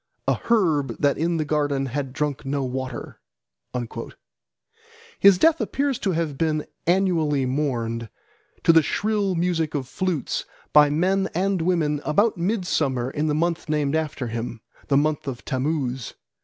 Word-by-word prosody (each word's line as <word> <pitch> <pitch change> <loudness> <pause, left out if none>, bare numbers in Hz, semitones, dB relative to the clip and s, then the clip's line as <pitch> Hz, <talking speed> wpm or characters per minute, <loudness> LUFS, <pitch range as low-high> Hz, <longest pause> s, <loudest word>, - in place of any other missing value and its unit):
A - - +4
herb 165 -12 +1
that 145 -1 +2
in 170 +1 +1
the 155 - -1
garden 145 -2 0
had 135 +1 -3
drunk 145 0 -2
no 140 0 -1
water." 130 -1 -5 2.0
His 200 -2 +7
death 325 - +4
appears 275 -2 -1
to 190 - 0
have 160 -4 -2
been 155 -2 0 0.2
annually 165 -7 +2
mourned, 120 -4 -2 0.5
to 165 - +6
the 165 - +7
shrill 205 +3 0
music 165 -3 0
of 135 -3 -2
flutes, 170 +2 -2 0.3
by 150 -1 +7
men 190 +6 +1
and 190 0 +1
women 160 -4 +1
about 205 +9 +2
midsummer 165 - 0
in 150 +2 -1
the 150 - +1
month 170 0 -1
named 150 -1 +1
after 155 -4 -2
him, 115 0 -4 0.3
the 140 - +3
month 150 0 0
of 125 -3 -5
Tammuz. 130 -3 -2
150 Hz, 145 wpm, -24 LUFS, 135-175 Hz, 2.0 s, His